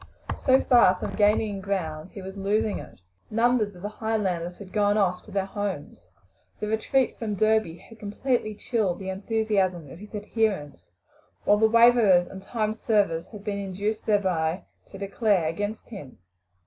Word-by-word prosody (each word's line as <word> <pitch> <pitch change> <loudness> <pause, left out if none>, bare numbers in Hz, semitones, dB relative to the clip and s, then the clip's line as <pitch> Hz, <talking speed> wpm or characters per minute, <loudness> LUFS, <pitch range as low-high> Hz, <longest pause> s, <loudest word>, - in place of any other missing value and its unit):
So 265 -1 +4
far 235 -8 +5
from - - -5
gaining 210 -1 +2
ground, 175 -4 -3
he 195 - -8
was 190 +1 -8
losing 205 +2 0
it. - - -12 0.3
Numbers 230 -2 +2
of 175 - -13
the 205 - -2
Highlanders 195 -6 -2
had 195 -2 -11
gone 205 0 +2
off 180 -3 +1
to - - -14
their 195 -1 0
homes. 190 - -5 0.5
The 210 - -3
retreat 220 +4 0
from 215 -3 -2
Derby 215 -5 +2
had 220 +5 -16
completely 215 +1 -1
chilled 205 -5 -1
the 190 -1 -5
enthusiasm 195 - -1
of 170 - -11
his 210 +2 -10
adherents, 205 - -2 0.6
while 205 - +5
the 220 +1 +4
waverers 230 -6 +6
and 190 +2 -10
time 215 +1 -2
servers 200 -7 +1
had 210 -3 -11
been 205 -1 -3
induced 200 +3 -3
thereby 185 -5 +1 0.2
to 195 - -11
declare 200 -3 +1
against 205 +7 -4
him. 190 - -10
205 Hz, 160 wpm, -26 LUFS, 185-220 Hz, 0.6 s, waverers